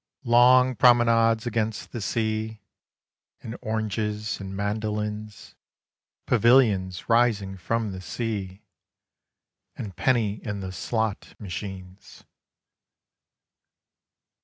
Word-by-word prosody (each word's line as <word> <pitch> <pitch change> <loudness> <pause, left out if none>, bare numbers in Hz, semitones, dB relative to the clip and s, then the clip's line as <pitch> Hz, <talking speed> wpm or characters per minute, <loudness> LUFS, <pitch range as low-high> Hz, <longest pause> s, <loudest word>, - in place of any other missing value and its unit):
Long 125 +2 +5
promenades 115 -1 +4
against 110 -2 -2
the 120 - -5
sea, 110 +1 -2 0.8
And 115 - -6
oranges 105 -1 -2
and 95 -1 -7
mandolines! 105 0 -4 0.7
Pavilions 110 -7 +3
rising 115 -5 +2
from 110 +4 -2
the 95 -1 -7
sea 95 +1 -5 1.1
And 100 -4 -7
penny 110 -5 0
in 105 -2 -4
the 95 -1 -5
slot 110 +3 -3
machines 95 -1 -8
110 Hz, 85 wpm, -25 LUFS, 100-115 Hz, 1.1 s, Long